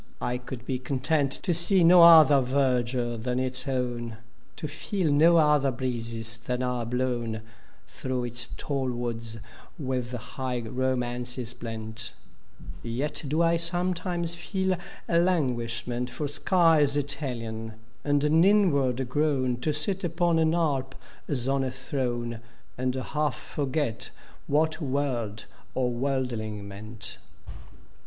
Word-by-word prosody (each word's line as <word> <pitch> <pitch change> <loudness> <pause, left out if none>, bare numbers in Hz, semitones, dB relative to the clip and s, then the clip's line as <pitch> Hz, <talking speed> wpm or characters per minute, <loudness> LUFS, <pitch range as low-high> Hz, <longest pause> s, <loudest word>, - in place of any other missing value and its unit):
I 125 0 -2
could 125 -1 -8
be 130 -1 -2
content 140 +2 0
To 180 - +2
see 175 +2 +4
no 175 +1 +8
other 160 -4 +9
verdnre 125 -3 0
than 125 +1 -1
its 130 +1 +1
own; 120 -3 -2 0.4
To 155 - -4
feel 160 +3 -1
no 165 +4 +6
other 150 -3 +4
breexes 115 -2 -2
than 125 +1 -2
are 125 -2 -2
blown 120 -3 -2 0.4
Diroagh 130 -2 -3
its 120 +1 -4
tall 135 -3 -1
woods 115 -2 -4 0.4
with 130 -4 -3
high 125 +1 -4
romances 125 0 -2
blent: 110 -2 -6 0.7
Yet 125 +8 -3
do 155 +5 +2
I 170 0 +3
sometimes 175 0 +2
feel 190 +2 -1 0.3
a 170 - +3
languishment 125 -7 0
For 145 +4 -3
skies 155 -2 +3
Italian, 120 -6 -4 0.3
and 145 -1 +2
an 155 +3 +4
inward 140 - +3
groan 130 -2 +1
To 140 +6 -1
sit 185 +6 -1
upon 170 -1 +1
an 160 +1 +3
Alp 135 -6 0 0.3
as 130 -3 +1
on 135 0 +1
a 130 - -1
throne, 125 -3 -3 0.4
And 130 0 -1
half 150 +2 -1
forget 135 -4 -2 0.4
what 160 +3 +1
world 130 -7 -2 0.3
or 125 -1 +1
worldling 120 -5 -2
meant. 105 +1 -8
130 Hz, 125 wpm, -27 LUFS, 120-150 Hz, 0.7 s, other